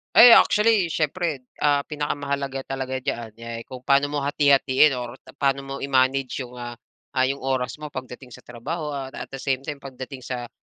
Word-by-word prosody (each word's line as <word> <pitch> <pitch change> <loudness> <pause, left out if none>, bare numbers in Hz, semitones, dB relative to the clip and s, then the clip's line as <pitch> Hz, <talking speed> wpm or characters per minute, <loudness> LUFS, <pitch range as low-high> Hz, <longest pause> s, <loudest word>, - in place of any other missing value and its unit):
Ay 240 0 +11
actually, 210 -5 +5
siyempre, 155 -3 -1 0.2
ah, 145 -1 +3
pinakamahalaga 140 -2 -3
talaga 130 -1 -3
diyan, 120 -3 -3
eh, 115 0 -6
kung 125 -1 -9
paano 140 +1 +4
mo 145 -1 -2
hati-hatiin 140 0 +4
or 120 -1 -5 0.2
paano 140 0 +1
mo 135 0 -7
i-manage 135 -1 +1
'yong, 125 -1 -9
ah, 120 0 -6 0.4
ah, 130 - +3
'yong 140 - -2
oras 130 -1 -2
mo 150 -1 -8
pagdating 130 0 -8
sa 125 - -12
trabaho 150 +7 -5
at 135 -2 -5
at - - -7
the 135 - -7
same 135 0 -1
time 145 +1 -5
pagdating 130 -1 -9
sa, 120 -2 -5
135 Hz, 180 wpm, -24 LUFS, 130-145 Hz, 0.4 s, Ay